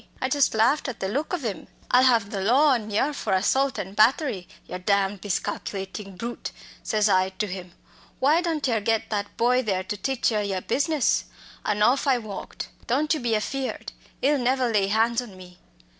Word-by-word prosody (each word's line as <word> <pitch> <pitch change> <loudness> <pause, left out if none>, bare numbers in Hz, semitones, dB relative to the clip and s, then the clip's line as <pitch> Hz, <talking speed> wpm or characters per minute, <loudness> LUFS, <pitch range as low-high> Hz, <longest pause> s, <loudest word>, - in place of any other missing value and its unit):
I 260 - -1
just 280 -3 +2
laughed 235 +8 +3
at 255 - -5
the 190 - -2
look 280 +10 -2
ov 345 -8 -2
'im. 210 -4 -4 0.2
'I'll 250 +1 +6
have 230 -5 +3
the 195 - -3
law 260 +10 +4
on 235 -5 +1
yer 245 +8 +1
for 215 -8 -2
assault 265 +8 +2
an' 190 +1 -5
battery, 215 - +2 0.2
yer 180 - -6
damned 200 +1 +1
miscalculatin' 195 0 -4
brute!' 235 +5 -5 0.3
says 215 -1 +1
I 185 -2 +3
to 190 +3 -3
him 180 -2 -7 0.4
'why 300 +6 +3
don't 325 -5 -1
yer 225 -4 +1
get 225 +1 0
that 205 -1 -3
boy 250 +2 +3
there 195 -6 -1
to 210 +2 -4
teach 260 +4 0
yer 215 -1 +1
your 195 -2 -2
business?' 290 - +1 0.4
An' 210 0 +1
off 260 +6 +3
I 265 -2 +4
walked. 215 -4 -7 0.2
Don't 295 +6 +2
you 310 - -1
be 235 -2 0
afeared 260 +5 -3 0.3
'ee'll 285 +1 +3
never 255 0 +1
lay 200 -3 +2
hands 225 +3 +2
on 210 -6 -11
me!" 180 -1 -14
225 Hz, 195 wpm, -25 LUFS, 200-260 Hz, 0.4 s, I'll